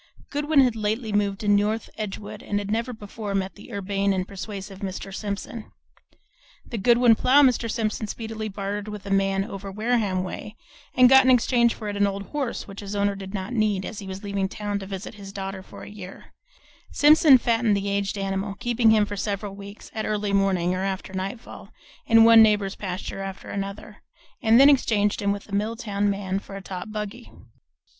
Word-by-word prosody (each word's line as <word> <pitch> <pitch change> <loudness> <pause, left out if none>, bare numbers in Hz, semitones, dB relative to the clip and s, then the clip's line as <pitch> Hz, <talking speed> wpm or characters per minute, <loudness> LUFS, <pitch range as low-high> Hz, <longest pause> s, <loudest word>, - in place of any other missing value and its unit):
Goodwin 295 0 +3
had 250 -3 +2
lately 215 +1 -2
moved 200 -1 0
to 210 - -4
North 205 +2 +2
Edgewood 210 0 -6
and 205 - -2
had 205 0 -3
never 230 +3 -1
before 210 -2 -6
met 195 0 -1
the 210 - -14
urbane 200 -1 0
and 185 -1 -2
persuasive 195 0 -7
Mr. 195 0 -6
Simpson. 205 +2 -5 0.9
The 230 - -5
Goodwin 240 +2 +5
plough 265 +6 +5
Mr. 245 -3 +2
Simpson 215 -1 -2
speedily 220 0 -5
bartered 200 +1 -4
with 210 -1 -7
a 200 - -5
man 195 0 +2
"over 195 0 -7
Wareham 210 -3 0
way," 210 +3 -7 0.4
and 255 0 +7
got 265 +1 +7
in 260 - +3
exchange 240 -1 +3
for 215 - -7
it 205 - -3
an 200 0 +3
old 200 0 -4
horse 285 -5 -3
which 195 0 -9
his 205 0 -6
owner 200 0 +1
did 195 0 -7
not 190 +5 -4
need, 210 -4 +1
as 220 - -6
he 200 - -8
was 190 +2 -7
leaving 200 -1 -2
town 205 0 -3
to 195 - -8
visit 195 +2 -6
his 200 -2 -10
daughter 195 -1 -5
for - - -12
a - - -9
year, 195 -2 -11 0.6
Simpson 295 -2 +7
fattened 230 -3 +2
the 200 0 -3
aged 200 0 -1
animal, 195 0 -2
keeping 240 +1 +2
him 215 -1 +5
for 205 - -6
several 200 0 -3
weeks 200 +1 -11
(at 220 - -3
early 210 -1 -1
morning 190 -3 +2
or 185 - -2
after 190 -1 -4
nightfall) 195 +5 -6 0.4
in 225 0 +7
one 230 0 +8
neighbor's 210 -3 +3
pasture 190 0 -5
after 195 0 -7
another, 200 +1 -6 0.4
and 230 -1 +5
then 275 - +9
exchanged 215 -8 +3
him 200 0 +1
with 200 0 -5
a 205 - -12
Milltown 205 -1 -1
man 195 -1 -2
for 195 - -11
a 195 - -6
top 185 +2 -6
buggy. 215 +3 -6
205 Hz, 195 wpm, -24 LUFS, 195-225 Hz, 0.9 s, then